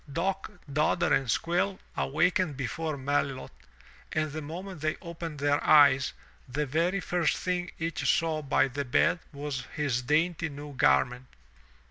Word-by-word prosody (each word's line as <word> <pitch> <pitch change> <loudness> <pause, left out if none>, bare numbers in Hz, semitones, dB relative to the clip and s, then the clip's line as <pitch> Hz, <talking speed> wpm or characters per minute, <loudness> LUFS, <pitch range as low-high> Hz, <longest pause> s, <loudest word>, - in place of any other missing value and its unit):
Dock, 190 +5 -1 0.2
Dodder 150 +1 +2
and 135 -3 +1
Squill 180 - +1 0.2
awakened 175 +1 +1
before 150 +3 -3
Melilot 135 -1 -1 0.6
and 155 -1 -1
the 155 +2 -5
moment 175 +3 -7
they 155 0 0
opened 165 -2 -7
their 145 0 +1
eyes, 140 -3 +6 0.4
the 145 +4 -1
very 165 +8 +1
first 175 -2 0
thing 180 -1 -2
each 165 +1 -2
saw 160 -2 0
by 140 -1 +2
the 140 +2 -3
bed 140 +6 +2
was 140 -3 -4
his 140 -5 0
dainty 160 +5 +1
new 145 0 -8
garment. 125 - +2
150 Hz, 140 wpm, -29 LUFS, 140-170 Hz, 0.6 s, eyes